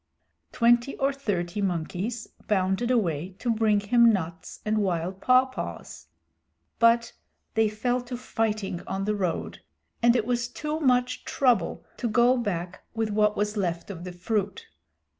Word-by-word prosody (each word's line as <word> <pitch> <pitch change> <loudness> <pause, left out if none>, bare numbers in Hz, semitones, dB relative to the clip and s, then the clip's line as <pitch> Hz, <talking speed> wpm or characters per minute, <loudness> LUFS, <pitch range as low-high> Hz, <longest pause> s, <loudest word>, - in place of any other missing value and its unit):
Twenty 240 +2 +3
or 275 +1 +1
thirty 205 -8 -2
monkeys 190 +5 -2 0.2
bounded 195 +3 +1
away 185 - 0
to 235 +1 0
bring 215 -2 +3
him 235 +3 +5
nuts 180 -3 -4
and 215 0 +1
wild 185 -1 -1
pawpaws. 255 +1 0 0.7
But 230 0 +4 0.4
they 220 -1 +3
fell 245 +4 -1
to 245 0 -5
fighting 215 -6 -2
on 195 0 -2
the 210 - +1
road, 185 -5 -3 0.4
and 235 0 +5
it 230 -3 +1
was 240 -1 0
too 300 +5 -4
much 250 -3 +1
trouble 240 -10 +1
to 240 - -2
go 240 +3 +4
back 185 -7 -3
with 225 -1 -1
what 210 0 +2
was 210 +1 0
left 175 -1 -2
of 175 -3 -8
the 180 - -6
fruit. 200 +3 -2
215 Hz, 145 wpm, -26 LUFS, 190-240 Hz, 0.7 s, him